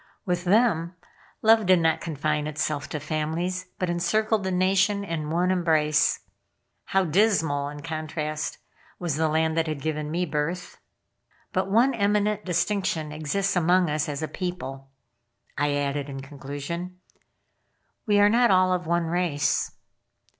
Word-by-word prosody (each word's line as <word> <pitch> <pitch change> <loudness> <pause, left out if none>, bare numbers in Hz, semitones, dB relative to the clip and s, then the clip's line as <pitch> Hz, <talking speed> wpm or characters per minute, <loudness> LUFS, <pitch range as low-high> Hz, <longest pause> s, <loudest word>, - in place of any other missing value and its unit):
With 180 -2 -1
them, 180 -4 +2 0.5
love 220 -2 +5
did 185 -1 +6
not 160 -1 +2
confine 150 -1 -1
itself 150 -1 -2
to 150 - -3
families, 160 +5 -2
but 185 - -1
encircled 195 +5 +1
the 190 - -1
Nation 190 +2 +2
in 165 -5 -4
one 175 +3 +1
embrace. 155 -4 +2 0.6
How 195 -1 +1
dismal, 160 -6 +2
in 145 0 -9
contrast, 155 -1 -4 0.4
was 170 -5 -2
the 160 +1 +1
land 160 +1 +1
that 165 0 +1
had 155 -2 -3
given 150 +1 -3
me 175 +3 0
birth. 160 +3 -3 0.7
"But - - 0
one 240 +7 +4
eminent 210 -1 +1
distinction 175 -3 -1
exists 155 +7 -1
among 175 -1 +3
us 150 0 -1
as 145 +1 -4
a - - -1
people," 135 -8 -5 0.7
I 145 -1 +1
added 145 0 -2
in 135 -1 -6
conclusion. 145 +6 -6 1.1
"We 205 -1 +4
are 205 - +7
not 240 +2 +4
all 185 -1 +4
of 180 -2 -2
one 170 0 +1
race." 165 -3 0
170 Hz, 145 wpm, -25 LUFS, 150-185 Hz, 1.1 s, are